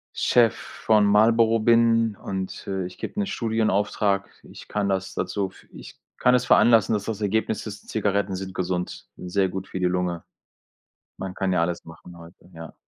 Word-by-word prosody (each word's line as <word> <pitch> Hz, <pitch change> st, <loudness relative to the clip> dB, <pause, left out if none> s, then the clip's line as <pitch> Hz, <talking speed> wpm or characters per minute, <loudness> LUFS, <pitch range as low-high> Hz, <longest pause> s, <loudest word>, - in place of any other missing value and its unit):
Chef 120 Hz, -3 st, +3 dB
von 110 Hz, -2 st, +1 dB
Marlboro 115 Hz, +2 st, +4 dB
bin 115 Hz, -1 st, +3 dB
und, 95 Hz, -1 st, -6 dB
äh, 95 Hz, -2 st, -3 dB
ich 90 Hz, -, -11 dB
gebe 210 Hz, -, -4 dB
'ne 205 Hz, -, 0 dB
Studienauftrag. 105 Hz, -, 0 dB, 0.2 s
Ich -, -, -12 dB
kann 105 Hz, -1 st, -1 dB
das 95 Hz, -1 st, -2 dB
dazu 100 Hz, -2 st, -2 dB
f -, -, -19 dB
ich -, -, -12 dB, 0.2 s
kann 125 Hz, -, +3 dB
das 125 Hz, 0 st, +3 dB
veranlassen, 115 Hz, -3 st, +5 dB
dass 105 Hz, -2 st, -2 dB
das 110 Hz, -1 st, -4 dB
Ergebnis 105 Hz, +1 st, -1 dB
ist: 105 Hz, -2 st, -9 dB
Zigaretten 100 Hz, -2 st, -1 dB
sind 95 Hz, 0 st, -6 dB
gesund 90 Hz, -1 st, -3 dB
n 90 Hz, -, -8 dB
sehr 95 Hz, +1 st, +1 dB
gut 95 Hz, +1 st, -6 dB
für -, -, -5 dB
die 90 Hz, -, +1 dB
Lunge. 90 Hz, -1 st, -1 dB, 0.9 s
Man 95 Hz, -1 st, -5 dB
kann 95 Hz, 0 st, -1 dB
ja 90 Hz, -2 st, +2 dB
alles 85 Hz, 0 st, -2 dB
machen 85 Hz, +1 st, -13 dB
heute, 85 Hz, +2 st, -16 dB
ja. 80 Hz, 0 st, -10 dB
100 Hz, 180 wpm, -24 LUFS, 95-110 Hz, 0.9 s, veranlassen